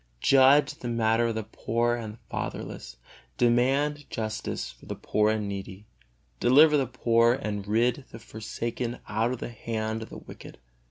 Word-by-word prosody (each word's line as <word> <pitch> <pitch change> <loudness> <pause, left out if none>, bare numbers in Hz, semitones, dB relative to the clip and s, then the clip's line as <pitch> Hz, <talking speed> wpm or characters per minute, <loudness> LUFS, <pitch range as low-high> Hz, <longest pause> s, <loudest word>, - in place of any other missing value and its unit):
Judge 135 - +5
the 120 - -5
matter 115 0 +2
of 115 - -2
the 110 - -2
poor 115 +3 -1
and 110 -2 -7
fatherless, - - -6 0.4
demand 135 +5 +2
justice 110 - -4
for - - -18
the - - -4
poor 105 0 +1
and 110 -1 -1
needy; 100 0 -7 0.5
deliver 150 +5 +6
the 135 -3 +2
poor 115 -1 +3
and 105 -5 -4
rid 120 +5 +1
the - - -10
forsaken 115 +2 -5
out 110 +4 0
of 130 - -3
the - - -6
hand 110 -1 -3
of 110 - -8
the - - -9
wicked." - - -12
115 Hz, 160 wpm, -27 LUFS, 110-125 Hz, 0.5 s, deliver